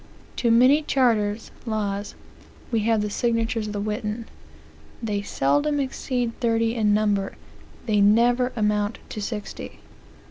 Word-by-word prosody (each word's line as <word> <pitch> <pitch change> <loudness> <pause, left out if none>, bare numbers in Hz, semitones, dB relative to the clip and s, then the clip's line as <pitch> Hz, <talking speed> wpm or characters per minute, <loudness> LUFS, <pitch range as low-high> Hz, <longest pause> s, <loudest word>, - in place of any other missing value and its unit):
To 235 - +1
many 255 +6 +6
charters 225 -7 +1
(laws) 205 -3 -3 0.6
we 230 - +2
have 220 0 +2
the 210 - -2
signatures 230 -1 0
of 210 - -5
the 205 - -3
Witan. 215 +2 -3 0.8
They 205 -2 -1
seldom 290 - +1
exceed 255 -3 -2
thirty 230 -1 +1
in 215 -3 +2
number; 205 -2 +1 0.5
they 210 -3 +2
never 240 +5 +4
amount 210 -1 0
to 215 - -5
sixty." 210 0 -6
225 Hz, 130 wpm, -24 LUFS, 210-240 Hz, 0.8 s, many